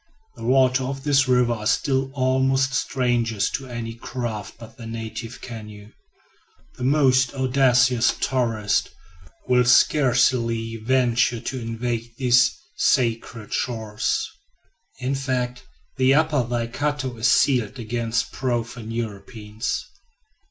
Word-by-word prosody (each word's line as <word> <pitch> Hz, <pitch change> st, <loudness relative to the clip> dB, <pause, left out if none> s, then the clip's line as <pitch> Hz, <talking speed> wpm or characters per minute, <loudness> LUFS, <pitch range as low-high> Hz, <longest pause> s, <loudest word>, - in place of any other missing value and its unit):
The -, -, -10 dB
waters 130 Hz, 0 st, +3 dB
of 135 Hz, 0 st, -5 dB
this 140 Hz, -2 st, +3 dB
river 125 Hz, -2 st, +3 dB
are 105 Hz, -2 st, -4 dB
still 135 Hz, +2 st, +1 dB
almost 130 Hz, +1 st, +1 dB
strangers 120 Hz, -6 st, 0 dB
to 135 Hz, -, -4 dB
any 120 Hz, -2 st, -5 dB
craft 115 Hz, -2 st, -5 dB
but 115 Hz, -1 st, -13 dB
the 115 Hz, -3 st, -9 dB
native 115 Hz, +1 st, -6 dB
canoe. 105 Hz, -3 st, -9 dB, 0.8 s
The -, -, -7 dB
most 130 Hz, -1 st, +3 dB
audacious 125 Hz, -2 st, +3 dB
tourist 115 Hz, -5 st, 0 dB, 0.6 s
will 125 Hz, -1 st, +4 dB
scarcely 120 Hz, -3 st, +3 dB
venture 120 Hz, 0 st, +1 dB
to 130 Hz, +1 st, -4 dB
invade 115 Hz, 0 st, -4 dB
these 125 Hz, -1 st, +4 dB, 0.2 s
sacred 115 Hz, -, 0 dB
shores; 110 Hz, -4 st, -1 dB, 0.7 s
in 130 Hz, +1 st, -2 dB
fact, 125 Hz, -2 st, -3 dB, 0.3 s
the 130 Hz, +1 st, +4 dB
Upper 155 Hz, -2 st, +2 dB
Waikato 125 Hz, +3 st, -2 dB
is 115 Hz, +2 st, +2 dB
sealed 125 Hz, -2 st, +2 dB
against 115 Hz, -1 st, -2 dB
profane 120 Hz, -3 st, -3 dB
Europeans. 110 Hz, 0 st, -4 dB
125 Hz, 110 wpm, -23 LUFS, 115-130 Hz, 0.8 s, will